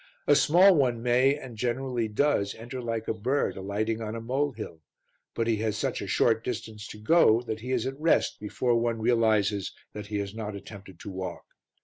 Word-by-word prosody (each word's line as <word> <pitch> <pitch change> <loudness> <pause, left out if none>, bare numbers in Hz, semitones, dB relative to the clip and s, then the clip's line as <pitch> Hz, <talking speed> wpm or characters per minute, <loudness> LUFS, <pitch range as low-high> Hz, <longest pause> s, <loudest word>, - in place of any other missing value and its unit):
A 145 - +5
small 175 +7 +6
one 125 -7 +1
may, 125 +3 +4
and 130 -5 -9
generally 120 0 -1
does, 105 -2 +1
enter 120 +3 -7
like 115 -2 -3
a - - 0
bird 125 +7 -1
alighting 105 +4 -2
on 110 0 -4
a - - -4
molehill, 120 - -3 0.5
but 115 - 0
he 115 -1 +1
has 110 -1 -1
such - - -2
a - - -5
short 115 -1 +2
distance 110 -3 -5
to - - -9
go 115 -1 +4
that 110 -2 -4
he 125 +4 -6
is 125 -2 0
at 135 +1 -4
rest 165 - +2
before 120 +3 -1
one 115 -1 -1
realizes 110 -4 +2 0.2
that 105 0 -7
he 105 -1 -3
has 100 -1 -3
not 110 -2 -5
attempted 95 -2 -11
to 100 - -7
walk. 95 -2 -6
115 Hz, 200 wpm, -27 LUFS, 105-125 Hz, 0.5 s, small